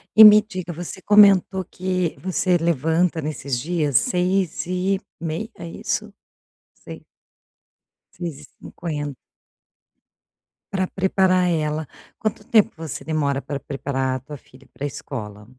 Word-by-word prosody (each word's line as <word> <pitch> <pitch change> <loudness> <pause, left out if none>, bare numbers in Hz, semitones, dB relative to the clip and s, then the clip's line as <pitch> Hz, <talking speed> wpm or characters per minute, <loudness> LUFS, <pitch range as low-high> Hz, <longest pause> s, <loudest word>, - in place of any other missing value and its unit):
E 220 - +11
me 210 0 +9
diga, 185 -5 -6
você 175 +3 -7
comentou 195 -2 +5
que 185 -1 -2
você 185 -1 +1
levanta 165 +1 +1
nesses 140 -3 -3
dias 150 0 -1
6h30, 185 -1 -1
é - - -8
isso? - - -3 0.6
6h - - -11 1.1
6h50. 150 -2 -6 1.6
Pra 190 -1 0
preparar 185 -1 +2
ela. 155 -1 0 0.3
Quanto 210 -1 -3
tempo 220 -5 +4
você 160 -5 -6
demora 145 -3 0
pra 140 - -5
preparar 135 -1 -2
a - - -3
tua 145 +2 -9
filha 130 +2 -20
pra 145 - -5
escola? 105 -6 -7
170 Hz, 110 wpm, -22 LUFS, 145-185 Hz, 1.6 s, E